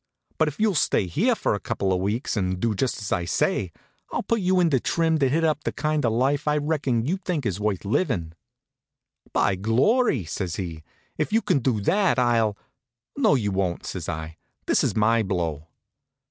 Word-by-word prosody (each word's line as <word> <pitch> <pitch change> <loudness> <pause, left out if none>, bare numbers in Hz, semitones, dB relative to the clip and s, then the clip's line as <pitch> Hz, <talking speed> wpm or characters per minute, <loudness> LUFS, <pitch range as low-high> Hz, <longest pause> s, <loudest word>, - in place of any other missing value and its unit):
But 160 - +4
if 150 - -5
you'll 215 -2 +3
stay 145 - +2
here 85 - +1
for - - 0
a - - -2
couple 95 -1 -1
of 90 - 0
weeks 105 +8 -1
and 95 -3 -1
do 115 +2 +1
just 125 +5 -1
as 105 - -6
I 85 - 0
say, 85 +1 0 0.4
I'll - - -2
put 230 -2 0
you 185 0 +2
in 170 -2 +3
trim 160 +4 +1
to 135 -3 +3
hit 160 +5 +1
up 150 -2 +1
the - - -1
kind 155 -1 -1
of 115 - +2
life 135 +5 +1
I 150 0 +3
reckon 145 -6 0
you 175 +7 0
think 175 -7 -3
is 100 -3 -1
worth 105 -2 -1
livin'. 100 - -1 1.0
"By 100 - +2
glory!" 120 - +2
says 85 +1 -4
he, 85 -5 -5 0.4
"if 155 - 0
you 225 +1 +2
can - - +2
do 120 -4 0
that 190 - +2
I'll 115 -4 +2 0.3
" 120 0 -65
"No 275 - +3
you 105 -6 0
won't," 95 -3 -1
say - - -4
I. 80 +1 -6 0.3
"This - - +2
is - - 0
my 110 +2 +3
blow." 85 -6 -2
120 Hz, 200 wpm, -24 LUFS, 95-155 Hz, 1.0 s, But